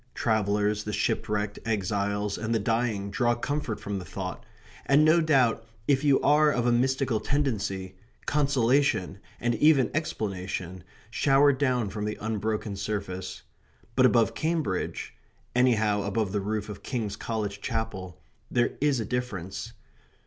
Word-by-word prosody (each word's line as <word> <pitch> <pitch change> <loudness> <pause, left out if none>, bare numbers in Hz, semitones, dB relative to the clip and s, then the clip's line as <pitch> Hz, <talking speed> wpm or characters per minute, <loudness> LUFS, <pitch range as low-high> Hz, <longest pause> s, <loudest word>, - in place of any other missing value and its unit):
Travellers, 105 -1 +1
the 105 - -4
shipwrecked, 105 +1 -1
exiles, 100 -1 -1
and 110 +1 -2
the - - +4
dying 110 -2 -1
draw 120 +4 +2
comfort 125 -2 -3
from 100 -1 -4
the - - -7
thought, 95 +4 -6 0.4
and 145 +3 +5
no 165 +2 +5
doubt 130 -8 +3 0.2
if 140 -1 +3
you 140 -2 +4
are 150 +1 +5
of 120 -4 0
a 120 - +4
mystical 130 -1 +1
tendency, 100 -10 -1 0.3
consolation, 135 -8 +2 0.2
and 120 0 +1
even 135 +1 +4
explanation, 95 - -3 0.3
shower 140 +3 +4
down 130 -6 0
from 105 +1 -3
the 105 - -3
unbroken 110 -1 -2
surface. 100 -2 -4 0.5
But 130 -1 +6
above 115 -4 +3
Cambridge 155 - -2 0.4
anyhow 110 -5 +3
above 100 0 -1
the 105 0 -1
roof 105 +1 -2
of 105 -1 -8
King's 110 -6 -3
College 105 -2 -3
Chapel 100 -6 -4 0.3
there 120 -1 +2
is 145 -3 +2
a 110 - -2
difference. 100 -6 -4
110 Hz, 140 wpm, -27 LUFS, 100-130 Hz, 0.5 s, But